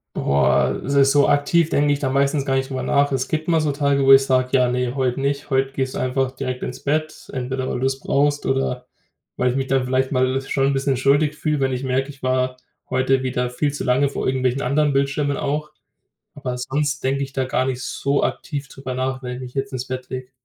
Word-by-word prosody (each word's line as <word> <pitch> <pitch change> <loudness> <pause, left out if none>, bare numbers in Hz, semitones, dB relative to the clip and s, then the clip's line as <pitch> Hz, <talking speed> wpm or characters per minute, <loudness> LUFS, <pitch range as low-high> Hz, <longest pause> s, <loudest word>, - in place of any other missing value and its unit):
Boah, 70 0 +2
s 140 - -2 0.2
so 145 -1 +4
aktiv 155 +3 +3
denke 145 0 +2
ich 145 - -2
da 135 - -1
meistens 140 +1 +1
gar 135 -1 +1
nicht 135 0 -2
drüber 130 -1 -3
nach. 140 0 +2
Es 130 0 -1
gibt 155 -1 -2
mal 165 -2 +3
so 150 - +1
Tage, 140 -1 +1
wo 135 - +6
ich 135 0 +8
sage: 130 -1 +2
„Ja, 125 -2 +4
ne, 125 0 -1
heute 130 -1 0
nicht. 140 +1 -2
Heute 135 0 +1
gehst 130 -1 -2
du - - -2
einfach 130 0 0
direkt 130 -1 -4
ins 125 - -5
Bett.“ 155 +2 -2
Entweder 130 0 -3
weil - - -2
du's 135 +1 0
brauchst 145 +1 +1
oder 125 -2 -1 0.5
weil 125 0 +2
ich 125 - -4
mich 135 -1 -1
da 135 -1 +2
vielleicht 130 +1 0
mal 130 0 +1
schon 135 0 0
'n 140 - +1
bisschen 135 -1 0
schuldig 145 +3 +2
fühle, 150 -2 -1
wenn 135 - +1
ich 130 +1 -3
merke, 130 +2 0
ich 140 -1 -12
war 130 0 0 0.3
heute 130 0 +1
wieder 125 -1 -1
viel 140 +4 -1
zu 145 - -4
lange 135 +2 +3
vor - - -3
irgendwelchen 130 0 0
anderen 145 +3 +2
Bildschirmen 140 +1 0
auch. 150 +2 -2 0.7
Aber 125 -3 -4
sonst 145 +3 -2
denke 135 +1 0
ich 135 0 -12
da 135 - 0
gar 130 0 0
nicht 130 -1 -3
so 140 +1 -1
aktiv 140 -2 -4
drüber 135 -2 -7
nach, 130 +1 -2
wenn 125 0 -4
ich 130 - -8
mich 125 +1 -9
jetzt 135 0 -3
ins 130 0 -4
Bett 130 -1 -5
lege. 130 0 -6
135 Hz, 235 wpm, -21 LUFS, 130-140 Hz, 0.7 s, ich